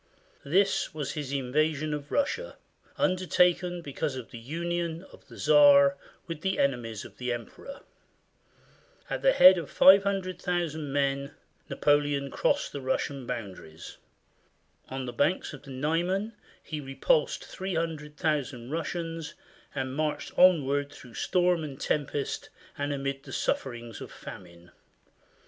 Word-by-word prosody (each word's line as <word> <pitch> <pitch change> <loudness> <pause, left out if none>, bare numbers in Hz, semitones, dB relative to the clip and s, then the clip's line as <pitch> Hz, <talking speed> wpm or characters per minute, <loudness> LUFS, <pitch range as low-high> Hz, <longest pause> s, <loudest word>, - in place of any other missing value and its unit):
This 190 +2 +1
was 150 -3 -3
his 145 -3 -5
invasion 150 +3 0
of 145 -1 -6
Russia, 470 - -1 0.4
undertaken 180 -1 +2
because 145 0 -3
of 130 -3 -8
the 120 - -8
union 170 +5 -3
of - - -17
the - - -13
Czar 280 -1 +6 0.3
with 165 -3 -6
the 190 0 0
enemies 120 -6 -1
of - - -13
the 125 -1 -2
emperor. 120 - -7 1.3
At - - -2
the - - +5
head 185 - +8
of 165 - -7
500,000 185 -5 +3
men, 140 0 -1 0.3
Napoleon 145 -1 +1
crossed - - +1
the 140 - -6
Russian 130 0 -2
boundaries. 95 -10 -7 0.9
On 130 0 -4
the 125 - -5
banks 175 +3 0
of 145 - -9
the 145 - -14
Niemen 170 - -1 0.3
he 155 -2 -5
repulsed 145 - +1
300,000 150 -7 -3
Russians 165 0 -4 0.4
and 130 -1 -3
marched 155 0 -2
on 180 -6 +6
ward 140 +1 -1
through 125 -4 -13
storm 180 +4 +1
and 140 -3 -7
tempest 145 -1 -2 0.3
and 145 0 -2
amid 135 -1 -3
the - - -12
sufferings 120 -3 -3
of - - -8
famine. 85 -1 -11
150 Hz, 130 wpm, -28 LUFS, 135-175 Hz, 1.3 s, head